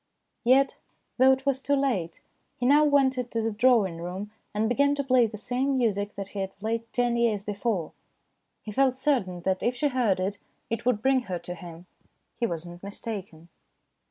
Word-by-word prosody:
Yet, 265 +3 +4 0.4
though 260 +1 +7
it 265 0 0
was 270 -1 +1
too 285 +1 +1
late, 225 -12 -1 0.4
he 245 - -2
now 290 +4 +6
went 275 -3 +3
into 240 -2 -2
the 225 0 0
drawing 215 -6 +3
room 185 +4 -5 0.2
and 215 +1 0
began 280 +4 +2
to 280 - -1
play 255 -3 +4
the 215 0 -8
same 260 +5 0
music 205 -4 0
that 195 -1 -6
he 200 - -6
had 195 0 -4
played 225 +2 -3
ten 245 -1 +1
years 225 -4 +1
before. 205 -4 -2 0.7
He 215 - -6
felt 260 +3 +2
certain 230 -11 0
that 190 +1 0
if 245 +1 0
she 290 +4 +1
heard 240 -8 +1
it 200 +2 -2 0.3
it 230 +1 -2
would 225 -3 +1
bring 265 -1 +3
her 180 - -1
to 175 +1 -7
him. 175 0 -11 0.5
He 235 - 0
was 170 -3 -4
not 175 0 -10
mistaken. 195 -5 -7
230 Hz, 190 wpm, -27 LUFS, 195-260 Hz, 0.7 s, though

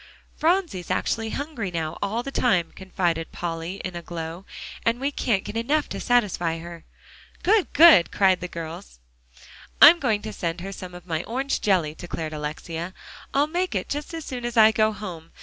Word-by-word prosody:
"Phronsie's 330 - 0
actually 225 -1 -1
hungry 275 -7 -4
now 165 -2 -4
all 215 +4 -1
the 275 - -5
time," 185 -11 +1
confided 175 -3 -2
Polly 165 +1 -4
in 185 -1 -5
a 170 - -4
glow, 170 +2 -7 0.4
"and 230 +1 +1
we 275 +2 -1
can't 220 -8 0
get - - -7
enough 280 +7 +1
to - - -5
satisfy 195 -9 +1
her." 170 0 -10 0.6
"Good 415 0 +3
good!" 300 - +8
cried 190 -2 +3
the 180 - -3
girls. 160 - -8 0.8
"I'm 340 +3 +10
going 220 -8 0
to 215 - -5
send 170 -3 -3
her 195 +2 -6
some 185 -2 -8
of 180 - -11
my 165 -1 -2
orange 265 +4 -2
jelly," 180 -7 +2
declared 160 -2 -6
Alexia. 160 +4 -5 0.4
"I'll 280 +1 +3
make 350 - -2
it 185 - -2
just 295 +1 -4
as 325 -2 -6
soon 250 -2 -5
as 240 0 -3
I 220 0 +8
go 215 0 +2
home. 180 -6 -8
195 Hz, 185 wpm, -24 LUFS, 170-245 Hz, 0.8 s, I'm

